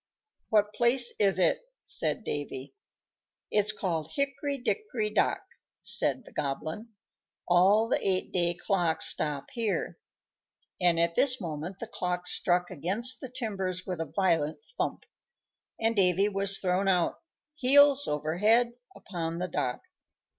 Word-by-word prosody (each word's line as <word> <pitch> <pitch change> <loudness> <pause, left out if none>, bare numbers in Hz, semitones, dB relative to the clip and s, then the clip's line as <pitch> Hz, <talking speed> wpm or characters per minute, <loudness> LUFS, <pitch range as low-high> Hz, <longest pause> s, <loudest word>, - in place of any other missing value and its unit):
"What 210 -2 +2
place 240 +1 +3
is 195 -4 +2
it?" 180 - +2 0.2
said 225 - -2
Davy. 140 -4 -6 0.8
"It's 210 0 +3
called 170 -7 -4
Hickory 280 0 -2
Dickory 245 - -2
Dock," - - 0 0.4
said 260 - +2
the - - -15
Goblin. 155 +10 -4 0.6
"All 195 +5 +4
the - - 0
eight 190 -1 +1
day 175 -1 +2
clocks 175 -3 +1
stop 145 -2 +2
here;" 230 -4 -3 0.8
and 175 -2 +3
at 170 0 +1
this 255 +6 +3
moment 170 +1 -6
the 230 - -6
clock 180 -4 -4
struck 180 0 +1
against 195 - 0
the 260 - -7
timbers 195 -7 -3
with 180 -3 -4
a - - -2
violent 165 -4 0
thump, - - -3 0.7
and 225 0 0
Davy 190 0 +4
was 195 -1 +1
thrown 185 +1 0
out, 180 -3 +1 0.3
heels 285 0 +5
over 155 +3 -3
head, 230 +3 +3 0.2
upon 165 -3 -5
the 180 +1 -3
dock. 125 -7 -3
190 Hz, 135 wpm, -28 LUFS, 170-225 Hz, 0.8 s, heels